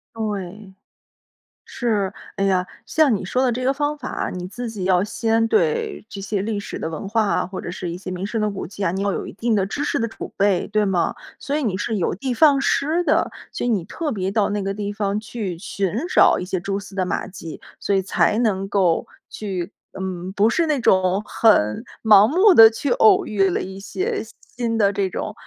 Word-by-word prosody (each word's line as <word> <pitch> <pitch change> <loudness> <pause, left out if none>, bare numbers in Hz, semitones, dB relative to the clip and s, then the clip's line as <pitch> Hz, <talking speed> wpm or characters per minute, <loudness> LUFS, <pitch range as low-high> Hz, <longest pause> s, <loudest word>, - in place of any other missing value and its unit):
对。 205 -2 -5 0.9
是， 210 -5 -1 0.2
哎 195 - 0
呀， 185 -2 +2 0.2
像 305 -6 +3
你 190 - -6
说 250 +7 0
的 255 - +3
这 250 +2 -3
个 265 - +3
方 290 +1 -1
法， 275 -4 -4
你 180 -1 -5
自 235 +5 -6
己 210 -4 -5
要 185 -1 +3
先 225 +2 0
对 165 +3 0
这 200 - -7
些 195 0 -2
历 210 -1 -2
史 - - -6
的 160 - -4
文 165 +5 -6
化 220 +1 +2
啊， - - 0
或 190 0 -7
者 - - -5
是 175 -1 -5
一 170 - -5
些 185 0 -7
名 185 +1 -4
胜 225 +2 -3
的 215 0 +1
古 195 - -5
迹 200 +1 -5
啊， - - +2
你 190 - -3
要 200 0 0
有 - - -4
一 - - -8
定 230 +2 -1
的 195 - +2
知 200 +9 -4
识 - - 0
的 230 - 0
储 225 - -8
备， 195 -3 +2
对 215 0 +2
吗？ 190 -3 0 0.2
所 285 +1 -2
以 305 - -1
你 210 -7 0
是 220 +1 -2
有 180 - 0
的 255 +5 -2
放 285 0 +5
矢 310 +5 +1
的， - - +2 0.2
所 - - -3
以 - - +1
你 205 -6 +1
特 300 - -4
别 190 -2 -2
到 205 0 +1
那 205 -1 -1
个 195 0 -2
地 205 0 -4
方 205 0 -1
去 215 -5 -5
寻 195 +1 -3 0.2
找 - - +6
一 - - -4
些 185 -1 -2
蛛 195 +2 -2
丝 200 -1 -10
的 185 -2 0
马 - - -2
迹， 180 -4 -9 0.2
所 200 - 0
以 190 - +1
才 200 +2 +1
能 195 -5 0
够 185 -5 +2 0.2
去 190 -2 -5 0.3
嗯， 185 -1 -4
不 210 +2 +3
是 335 +7 +1
那 305 -3 +1
种 185 0 +3
很 105 - +3 0.2
盲 210 -2 +7
目 375 - +5
地 225 -8 +9
去 240 +5 -3
偶 220 - +5
遇 195 -2 +1
了 - - -1
一 190 +1 -7
些 400 - -3 0.3
新 235 -2 -1
的 205 -2 +3
这 195 -1 0
种， 210 - -4
205 Hz, 245 characters per minute, -22 LUFS, 190-230 Hz, 0.9 s, 地